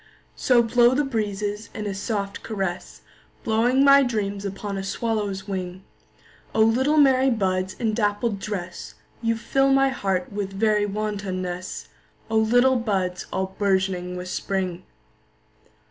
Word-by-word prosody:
So 245 -2 +3
blow 240 +2 +4
the 295 - +2
breezes 210 -4 -3
in 215 - -4
a 200 - -2
soft 200 0 -3
caress, 195 -5 -4 0.4
Blowing 240 +5 +3
my 280 0 +7
dreams 205 -5 -2
upon 200 +1 -4
a 195 - -3
swallow's 205 -1 -2
wing;O 185 +2 -8
little 260 +7 +2
merry 270 -2 +5
buds 190 -5 0
in 225 -3 -1
dappled 210 0 0
dress, 185 -4 -6 0.3
You 230 -1 0
fill 270 +4 +2
my 270 0 +4
heart 195 -7 -2
with 200 -1 -3
very 210 0 +2
wantonness—O 195 0 -5
little 245 +4 +4
buds 190 -6 -2
all 190 0 -3
bourgeoning 190 -2 0
with 180 0 -6
Spring! 185 -2 -3
205 Hz, 130 wpm, -24 LUFS, 190-230 Hz, 0.4 s, my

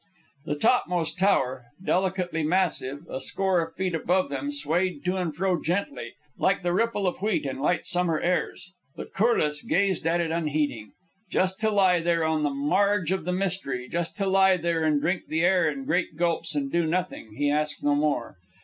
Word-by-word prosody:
The 145 - -2
topmost 180 -3 +1
tower, 130 -10 +1 0.2
delicately 180 -3 0
massive, 155 -3 -1
a 130 - -5
score 190 +5 +1
of 165 0 -6
feet 185 -1 -2
above 180 +3 +1
them, 285 - -3
swayed 180 - -1
to 180 +1 +1
and 175 -5 -2
fro, 185 0 0
gently, 200 - -3 0.3
like - - +1
the 175 0 0
ripple 225 0 0
of 180 - -1
wheat 210 -7 0
in 135 -1 -4
light 170 +5 0
summer 175 -3 +1
airs. 180 +1 -2 0.2
But - - -9
Corliss 155 -9 +2
gazed 190 -3 0
at 170 +1 +2
it 165 -2 -1
unheeding. 150 -8 -2 0.4
Just 190 +1 0
to 220 0 +2
lie 190 -4 +4
there, 170 0 +1
on 160 -1 +1
the 150 - +1
marge 180 +6 +1
of 190 -4 -1
the 180 - -1
mystery, 180 -9 -2
just 170 +2 -3
to 200 - 0
lie 190 -1 +4
there 165 -1 0
and 150 -2 +2
drink 175 +5 -1
the 160 +1 -1
air 180 -2 +3
in 140 -2 -5
great 165 0 -1
gulps, 170 -2 0
and 140 -2 -2
do 170 -1 +1
nothing! 170 -10 -3
he 145 +3 +1
asked 150 0 -1
no 145 - +3
more. 145 -8 -1
170 Hz, 190 wpm, -26 LUFS, 150-190 Hz, 0.4 s, lie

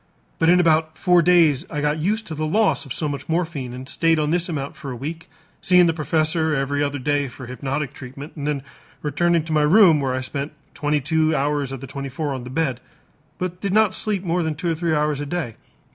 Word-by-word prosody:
But 165 - +4
in 180 +1 +6
about 160 -2 +2
four 180 -2 +4
days 165 -5 +4
I 150 - -3
got 150 +1 0
used 215 +7 0
to 165 - -6
the 155 0 -2
loss 210 0 +2
of - - -12
so 155 - 0
much 145 +1 -5
morphine 160 -7 -2
and 130 +1 -8
stayed 165 +2 +2
on 150 0 0
this 175 +1 +1
amount 140 -4 -4
for 140 - -8
a 125 - -4
week, 160 +7 -6 0.3
seeing 180 -1 +5
the 165 - +2
professor 160 0 +1
every 140 +1 -1
other 145 0 -1
day 145 +1 0
for 130 +1 -10
hypnotic 135 +3 -3
treatment 135 +3 -9
and 145 -2 -4
then 145 -3 -1 0.4
returning 165 +3 +1
to 160 0 -4
my 155 - +3
room 165 0 +6
where 130 -2 -1
I 130 - -2
spent 140 +3 -4 0.2
twenty 150 0 0
two 155 +2 +1
hours 145 -1 0
of 135 -2 -6
the - - -6
twenty 140 +1 -5
four 145 +1 -3
on 130 -2 -6
the - - -7
bed, 130 -3 -1 0.6
but 180 0 -4
did 195 -2 -1
not 215 -2 +4
sleep 205 -3 0
more 175 0 0
than 160 -2 -1
two 170 +2 -2
or - - 0
three 165 -1 0
hours 150 -1 0
a - - -3
day. 150 -7 -3
155 Hz, 235 wpm, -22 LUFS, 140-170 Hz, 0.6 s, in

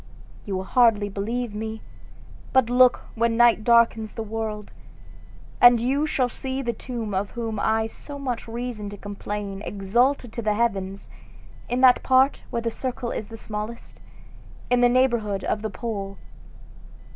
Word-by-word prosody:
You 195 - -2
will 185 - -2
hardly 210 -1 +3
believe 225 +4 -3
me; 220 +1 -5 0.7
but 260 -3 +3
look 250 0 +5
when 230 0 +1
night 240 -2 +5
darkens 230 -2 +3
the 225 - -4
world, 215 -1 -5 0.9
and 245 -1 +8
you 275 +6 +1
shall 260 -4 +1
see 265 +2 -4
the 235 -1 -1
two 225 -3 -5
of 195 +1 -1
whom 225 -3 -4
I 220 +1 +2
have 220 - -5
so 285 -1 -9
much 255 -5 -4
reason 230 -3 -5
to 205 - -9
complain 205 0 -5
exalted 235 +6 0
to 235 - -4
the 210 -1 0
heavens, 195 -4 -1 0.6
in 245 +1 0
that 255 -1 +6
part 260 +1 +3
where 235 - -3
the 230 - -1
circle 250 0 -4
is 210 - -4
the 225 - -10
smallest, 215 +2 -7 0.7
in 245 0 +4
the 245 - +6
neighborhood 235 -6 +1
of 210 - -1
the 220 - -3
pole. 200 -1 -5
230 Hz, 160 wpm, -24 LUFS, 210-245 Hz, 0.9 s, and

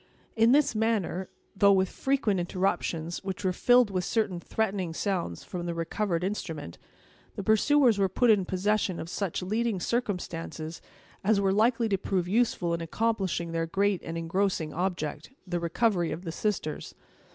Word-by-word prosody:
In 225 +1 +5
this 290 -1 +4
manner, 215 -4 0 0.3
though 200 +1 +5
with 190 0 +3
frequent 245 -5 0
interruptions 175 -2 -1
which 190 0 -4
were 185 - +2
filled 245 +2 +4
with 185 -1 -1
certain 200 -3 0
threatening 190 -4 -2
sounds 180 - -2
from 175 -1 -5
the 170 - -2
recovered 170 +1 -1
instrument, 160 - -4 0.6
the 200 - -4
pursuers 230 +2 +4
were 195 -1 +3
put 235 +5 +4
in 205 -3 +4
possession 190 0 0
of 165 - -6
such 185 -2 -2
leading 215 +1 0
circumstances 170 -7 -3 0.4
as 205 +1 +3
were 195 -1 +2
likely 230 +2 +3
to 195 -3 0
prove 185 -2 -1
useful 195 -5 +1
in 170 - -2
accomplishing 190 -2 -1
their 165 0 -1
great 195 +1 +1
and 165 0 -5
engrossing 165 -1 -1
object—the 175 - -3
recovery 175 0 +1
of 165 +4 -5
the 165 - -4
sisters. 175 -5 -3
190 Hz, 155 wpm, -28 LUFS, 170-215 Hz, 0.6 s, In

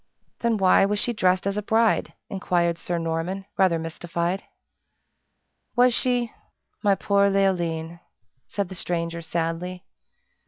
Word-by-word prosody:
"Then 235 -2 +1
why 190 -1 +5
was 205 +1 +1
she 240 +3 0
dressed 185 -3 +2
as 200 +1 -1
a - - 0
bride?" 225 +2 +2
inquired 175 -3 0
Sir 175 - -2
Norman, 165 +4 -2
rather 185 -3 +3
mystified. 170 +3 -2 1.3
"Was 245 0 +5
she? 245 -1 0 0.5
My 200 -2 +4
poor 200 0 +3
Leoline!" 170 -4 0 0.5
said 200 -3 -3
the - - -7
stranger, 170 -1 -2
sadly. 170 +2 -3
185 Hz, 125 wpm, -25 LUFS, 170-200 Hz, 1.3 s, why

